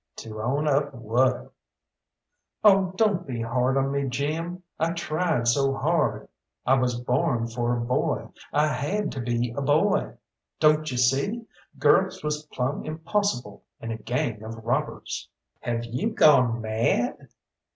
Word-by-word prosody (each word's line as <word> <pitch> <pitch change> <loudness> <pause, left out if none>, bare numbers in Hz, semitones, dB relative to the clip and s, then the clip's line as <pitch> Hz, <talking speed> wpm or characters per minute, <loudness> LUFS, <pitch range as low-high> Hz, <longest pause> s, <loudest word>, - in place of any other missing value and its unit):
"To 110 -1 -7
own 140 +7 0
up 140 -1 +1
what?" 120 +3 0 1.1
"Oh, 195 -3 +5
don't 195 -5 +1
be 120 -3 -4
hard 125 +3 +1
on 135 0 +1
me, 140 -1 -1
Jim! 160 +7 -3 0.2
I 165 +1 +1
tried 160 -6 -1
so 135 +3 +3
hard! 155 +2 0 0.4
I 130 - +4
was 125 -2 +1
born 120 -1 0
for 120 +1 -1
a - - -2
boy, 125 +5 -1 0.2
I 150 +1 +3
had 150 +10 -1
to 130 - -4
be 120 0 -1
a 140 - -2
boy. 165 +9 +2 0.4
Don't 155 0 +4
you 125 - -3
see, 140 - +1 0.3
girls 190 +5 +3
was 150 0 -3
plumb 130 0 -2
impossible 155 - -2 0.2
in 115 - -5
a 110 - -3
gang 115 -1 -2
of 110 0 -8
robbers!" 135 +6 -2 0.3
"Have 120 -1 -2
you 125 - -2
gone 125 - +4
mad?" 110 +1 0
135 Hz, 145 wpm, -26 LUFS, 120-155 Hz, 1.1 s, Oh